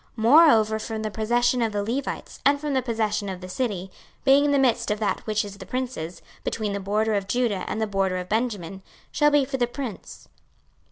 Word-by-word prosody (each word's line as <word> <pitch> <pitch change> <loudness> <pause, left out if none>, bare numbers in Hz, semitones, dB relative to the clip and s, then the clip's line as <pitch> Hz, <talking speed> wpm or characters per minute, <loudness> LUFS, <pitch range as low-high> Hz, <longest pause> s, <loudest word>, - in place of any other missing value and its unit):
26:048:022 220 - -4
Moreover 230 -5 +6
from 220 0 -4
the 215 - -3
possession 240 +3 +1
of 225 -2 0
the 205 0 -1
Levites, 255 +6 -4
and 285 0 +4
from 295 -1 -3
the 260 - +2
possession 220 -4 -1
of 185 -1 -5
the 185 - -8
city, 190 -2 -3 0.3
being 275 +2 +5
in 290 - +2
the 285 - +3
midst 260 -4 +2
of 210 - 0
that 215 - 0
which 215 0 0
is 200 0 -10
the 190 - -8
prince's, 250 -10 -4 0.2
between 215 -2 -2
the 200 - -2
border 210 +3 0
of 200 -2 -1
Judah 220 -3 0
and 220 - -3
the 220 - +1
border 195 -3 0
of 180 0 -5
Benjamin, 205 -5 -2 0.3
shall 295 0 +3
be 290 -2 +3
for 265 0 -3
the 240 -2 +1
prince. 240 -4 -7
220 Hz, 220 wpm, -25 LUFS, 200-255 Hz, 0.3 s, Moreover